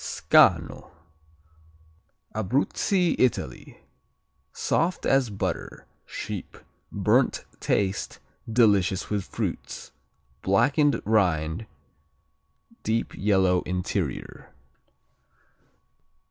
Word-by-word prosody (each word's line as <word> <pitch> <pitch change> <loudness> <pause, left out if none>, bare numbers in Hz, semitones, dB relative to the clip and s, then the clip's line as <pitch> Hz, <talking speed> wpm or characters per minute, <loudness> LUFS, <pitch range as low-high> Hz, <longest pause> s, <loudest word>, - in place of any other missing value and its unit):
Scanno - - +3 1.4
Abruzzi, 140 - +1
Italy 130 -3 -1 0.7
Soft 175 +2 -1
as 135 -3 +3
butter; 100 - -4 0.2
sheep; - - -6 0.3
burnt - - +1
taste, 100 -1 -1 0.3
delicious 100 -6 +2
with 100 -3 -1
fruits. - - -5 0.5
Blackened 135 +9 +3
rind, 90 -3 +1 1.1
deep 115 +1 -1
yellow 95 -3 +2
interior. 90 0 -3
105 Hz, 65 wpm, -26 LUFS, 95-125 Hz, 1.4 s, Scanno